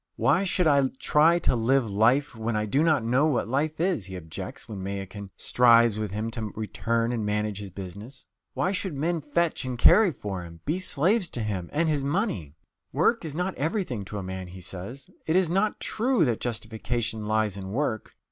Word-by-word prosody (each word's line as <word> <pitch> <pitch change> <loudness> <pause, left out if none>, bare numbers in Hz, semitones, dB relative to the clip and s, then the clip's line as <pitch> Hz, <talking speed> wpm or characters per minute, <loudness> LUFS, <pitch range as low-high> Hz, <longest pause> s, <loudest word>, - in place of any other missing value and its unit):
"Why 155 +8 +3
should 180 -1 +1
I 140 -3 +4
try 160 +5 +4
to 165 - +1
live 120 +2 +2
life 120 +7 +2
when 115 0 -2
I 105 0 0
do 135 +8 +1
not 155 -7 +3
know 130 +6 +3
what 135 -8 0
life 150 +6 -1
is?" 170 - 0
he 95 - -7
objects 80 -3 -7
when 105 -4 -6
Mayakin 100 +1 -6
strives 115 -3 +4
with 105 -1 -2
him 110 +4 -3
to 110 -3 -4
return 115 +2 -1
and 115 -3 -2
manage 105 0 -1
his 100 -1 -7
business. 100 +8 -9 0.3
Why 185 - +1
should 190 -4 -2
men 165 +4 -1
fetch 160 +3 0
and 130 -1 -4
carry 190 - +6
for 100 - -5
him? 85 -1 -11
be 160 +5 0
slaves 185 +3 +1
to 120 - -4
him 95 -5 -3
and 165 +3 +1
his 150 -3 0
money? 140 - -1 0.4
"Work 175 - +2
is 155 -3 -5
not 180 +3 -1
everything 155 - -1
to 105 - -6
a 100 - -4
man," 95 0 -5
he 90 +1 -10
says; 100 +8 -7 0.2
"it 160 - +2
is 185 -3 +3
not 200 +4 +1
true 235 -5 +1
that 120 -4 -1
justification 115 -1 -2
lies 110 -2 +1
in 95 -1 -6
work 115 -2 -2
120 Hz, 200 wpm, -26 LUFS, 105-155 Hz, 0.4 s, carry